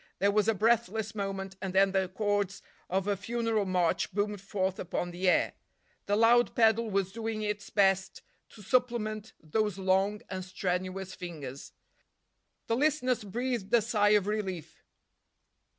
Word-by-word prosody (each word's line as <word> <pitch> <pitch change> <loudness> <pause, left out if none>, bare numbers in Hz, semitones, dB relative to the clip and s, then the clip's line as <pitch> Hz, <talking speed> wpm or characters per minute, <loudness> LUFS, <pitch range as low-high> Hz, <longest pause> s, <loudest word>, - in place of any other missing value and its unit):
There 200 +1 +3
was 210 0 +2
a 225 - +3
breathless 220 0 +1
moment, 195 -2 -4
and 190 -1 -4
then 195 0 +5
the 190 -1 0
chords 205 0 -1 0.3
of 190 +2 0
a 205 - +2
funeral 225 +1 -1
march 180 -3 +1
boomed 205 0 -1
forth 190 -1 -2
upon 175 0 -3
the 180 +2 +1
air. - - +2 0.5
The 205 - +2
loud 235 +2 +4
pedal 225 -1 +3
was 195 -2 0
doing 225 0 -3
its 210 -1 -3
best 195 -2 +2 0.3
to 210 - -14
supplement 220 -2 0
those 210 +5 -1
long 195 +2 +1
and 185 -1 -5
strenuous 185 0 -3
fingers. 150 -7 -8 0.9
The 230 - 0
listeners 255 -5 +1
breathed 230 0 -3
a 235 - +5
sigh 210 -1 +3
of 200 - -1
relief. 195 -6 -4
205 Hz, 150 wpm, -30 LUFS, 190-220 Hz, 0.9 s, then